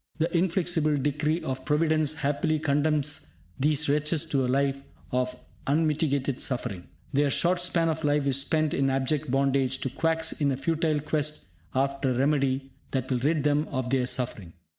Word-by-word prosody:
The 165 +2 -1
inflexible 170 -3 +2
decree 150 +4 0
of 130 0 -4
Providence 155 0 +1
happily 145 +1 0
condemns 150 - 0 0.3
these 150 +2 +2
wretches 150 +2 +1
to 135 -2 +2
a - - 0
life 140 +1 +1 0.3
of 125 0 -1 0.3
unmitigated 145 -3 +1
suffering. 100 -8 -3 0.3
Their 140 +1 +3
short 175 +5 +2
span 175 -2 +2
of 160 0 -2
life 145 -1 +2
is 140 0 +2
spent 155 +1 0
in 135 0 +1
abject 135 +2 0
bondage 135 0 +1
to 135 - -2
quacks 160 +3 0
in 145 -2 0
a 130 - -1
futile 155 0 0
quest 150 - -2 0.3
after 135 +1 0
a - - +1
remedy 135 -1 +1 0.2
that 130 0 -2
will 125 - +1
rid 150 +3 +1
them 150 +1 +2
of 130 -3 -3
their 130 -2 +2
suffering. 110 -10 -3
145 Hz, 165 wpm, -27 LUFS, 135-155 Hz, 0.3 s, Their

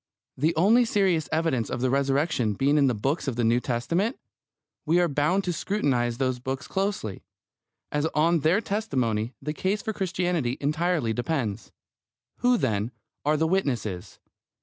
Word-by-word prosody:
The 155 +5 +1
only 215 +9 +5
serious 190 -8 +1
evidence 160 -8 0
of - - -3
the 130 0 +1
Resurrection 140 -3 +1
being 140 +6 +2
in 140 - +4
the 125 - +1
books 135 +10 -1
of 130 - -1
the 120 - 0
New 115 +2 +3
Testament, 170 - -1 0.7
we 165 +3 +3
are 175 - +3
bound 150 +6 +1
to 180 - -1
scrutinise 130 - 0
those 130 -1 0
books 130 +2 -4
closely, 195 - -2 0.7
as 150 +1 +1
on 165 +2 +3
their 165 +8 +2
testimony 125 - -1
the 150 +2 -2
case 190 +6 -1
for 220 - -2
Christianity 175 -9 -1
entirely 150 -4 0
depends. 120 -4 -2 0.7
Who, 245 0 +3
then, 105 - 0 0.4
are 150 +1 +3
the 160 - +2
witnesses? 125 - -1
150 Hz, 155 wpm, -26 LUFS, 125-180 Hz, 0.7 s, only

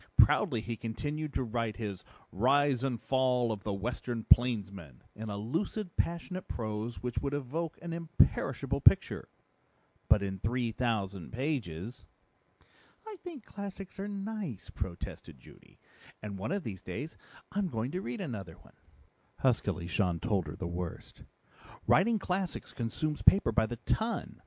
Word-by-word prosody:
Proudly 135 - +6
he 115 +1 -3
continued 145 +7 -3
to - - +2
write 115 -2 -1
his 100 -5 -4 0.3
Rise 135 +4 +3
and 125 -4 0
Fall 125 -2 +2
of 105 -2 -3
the 105 - -1
Western 115 +3 -2
Plainsman 100 - +3
in 110 +1 -5
a 100 - -3
lucid, 170 - -2
passionate 175 +2 -1
prose 110 +1 -3
which 125 -1 -1
would 140 0 -1
evoke 150 +4 -2
an 170 -1 -3
imperishable 165 0 +2
picture - - +5 0.8
but 105 -1 +6
in 95 -1 -3
three 120 +3 0
thousand 100 -7 -1
pages." 120 - -3 1.0
"I 435 -2 -7
think 335 -9 -8
classics 195 -1 -7
are 200 - -2
nice," 200 - -4
protested 85 -6 -5
Judy, - - -17 0.5
"and 100 -2 -5
one 110 - -2
of 200 -1 0
these 95 - -5
days 145 +10 -5 0.4
I'm 200 0 +1
going 120 -4 -2
to 185 - -2
read 210 +2 -4
another 100 - -5
one." - - -19 0.7
Huskily 100 -8 +2
Jean 85 0 +1
told 100 -7 +1
her 75 - -5
the 95 - -4
worst. 85 0 -5 0.6
"Writing 220 +4 +5
classics 185 -2 -2
consumes 150 +6 -2
paper 190 -11 +6
by 110 0 +3
the 120 - -4
ton. 225 +1 -1
120 Hz, 145 wpm, -32 LUFS, 105-165 Hz, 1.0 s, Proudly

